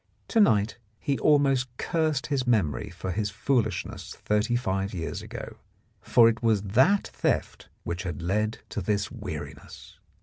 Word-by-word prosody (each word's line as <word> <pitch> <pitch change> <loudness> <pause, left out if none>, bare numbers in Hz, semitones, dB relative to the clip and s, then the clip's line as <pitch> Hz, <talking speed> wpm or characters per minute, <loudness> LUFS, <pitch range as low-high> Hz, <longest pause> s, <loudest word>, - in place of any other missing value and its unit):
To 230 - +2
night 110 - +3 0.2
he 140 -1 -1
almost 135 -4 +3
cursed 155 -5 0
his 135 -4 -1
memory 105 -2 +1
for 90 +1 -5
his 105 +3 -1
foolishness 110 -3 -1
thirty 105 +3 0
five 95 -4 -1
years 80 -2 -4
ago, - - -8 0.4
for 115 -2 +5
it 115 0 +1
was 110 -4 +2
that 130 - +3
theft - - -2
which 85 +2 -3
had 90 -2 -4
led 105 +5 -1
to - - -3
this 100 -2 -1
weariness. - - -8
110 Hz, 145 wpm, -27 LUFS, 100-130 Hz, 0.4 s, for